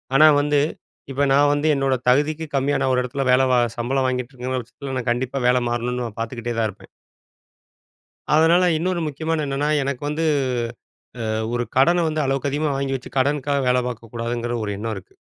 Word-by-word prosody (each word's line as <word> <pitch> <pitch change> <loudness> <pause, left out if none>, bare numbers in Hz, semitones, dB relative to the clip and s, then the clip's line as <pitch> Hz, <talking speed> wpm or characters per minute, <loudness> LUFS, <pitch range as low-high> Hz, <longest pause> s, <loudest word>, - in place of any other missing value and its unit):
ஆனா 155 +3 +8
வந்து, 145 0 +2 0.5
இப்ப 140 +2 +1
நான் 145 +1 +4
வந்து, 145 +2 +1
என்னோட 135 -1 +1
தகுதிக்கு 150 +4 +1
கம்மியா, 140 +1 +1
நான் 130 -1 +2
ஒரு 125 - +2
எடத்துல 135 +2 -3
வேல 130 +1 +5
வ - - +5 0.2
சம்பளம் 130 +3 0
வாங்கிட்ருக்கேன்னு 130 0 -3
வச்சிக்கங்களேன், 130 +2 -6
நான் 125 - -3
கண்டிப்பா 130 +3 -2
வேல 125 0 +3
மாறணுன்னு, 120 0 -2
பாத்துக்கிட்டே 115 0 -4
தான் 110 - +2
இருப்பேன். 100 - -14 1.5
அதனால, 165 +3 +5
இன்னொரு 175 +2 -1
முக்கியமானது 155 +1 -2
என்னன்னா, 140 +2 -1
எனக்கு 135 -2 -3
வந்து 155 +2 -2 1.1
அ - - -1 0.2
ஒரு 120 0 0
கடனை 170 +6 +4
வந்து, 155 -1 -1
அளவுக்கு 135 +1 0
அதிகமா 145 +1 0
வாங்கி 135 0 -1
வச்சு, 130 +1 -12
கடனுக்காக 140 0 +1
வேல 125 0 +3
பாக்கக்கூடாதுங்கிற 120 0 -4
ஒரு 105 - -3
எண்ணம் 110 +1 -3
இருக்கு. 95 - -12
135 Hz, 170 wpm, -22 LUFS, 125-145 Hz, 1.5 s, ஆனா